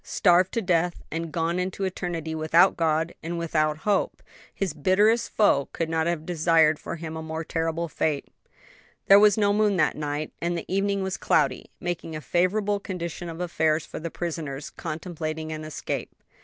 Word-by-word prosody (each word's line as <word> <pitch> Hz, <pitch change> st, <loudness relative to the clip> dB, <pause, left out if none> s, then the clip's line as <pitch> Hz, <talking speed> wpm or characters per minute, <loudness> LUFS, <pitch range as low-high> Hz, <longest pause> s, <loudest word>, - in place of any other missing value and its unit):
Starved 180 Hz, 0 st, +3 dB
to 230 Hz, -, 0 dB
death 175 Hz, -1 st, +1 dB
and 165 Hz, 0 st, -3 dB
gone 170 Hz, +2 st, 0 dB
into 185 Hz, +2 st, -3 dB
eternity 175 Hz, -4 st, -3 dB
without 160 Hz, +4 st, +4 dB
God 160 Hz, 0 st, +1 dB
and 170 Hz, +1 st, -4 dB
without 155 Hz, -2 st, 0 dB
hope! 205 Hz, -2 st, 0 dB, 0.3 s
his 190 Hz, -6 st, -2 dB
bitterest 210 Hz, +9 st, +3 dB
foe 140 Hz, -10 st, +3 dB
could 165 Hz, -1 st, -2 dB
not 160 Hz, 0 st, 0 dB
have 170 Hz, -2 st, -1 dB
desired 160 Hz, -2 st, +3 dB
for -, -, -5 dB
him 160 Hz, -1 st, -6 dB
a 160 Hz, -, -4 dB
more 160 Hz, +1 st, -4 dB
terrible 165 Hz, +1 st, -2 dB
fate. 150 Hz, -2 st, -1 dB, 0.8 s
There 200 Hz, +1 st, +8 dB
was 210 Hz, -1 st, +5 dB
no 205 Hz, -1 st, +3 dB
moon 210 Hz, -1 st, +3 dB
that 155 Hz, -, +2 dB
night, 150 Hz, 0 st, -3 dB
and 170 Hz, 0 st, -1 dB
the 170 Hz, -, -5 dB
evening 195 Hz, +1 st, 0 dB
was 190 Hz, 0 st, -2 dB
cloudy, 140 Hz, -4 st, +1 dB
making 175 Hz, -2 st, -4 dB
a -, -, -3 dB
favorable 200 Hz, +5 st, +1 dB
condition 175 Hz, -3 st, -5 dB
of 165 Hz, 0 st, -7 dB
affairs 160 Hz, -3 st, +1 dB
for -, -, -7 dB
the 165 Hz, -, -4 dB
prisoners 155 Hz, -5 st, -5 dB
contemplating 160 Hz, -1 st, -5 dB
an 155 Hz, 0 st, -5 dB
escape. 155 Hz, 0 st, -4 dB
170 Hz, 175 wpm, -26 LUFS, 160-185 Hz, 0.8 s, There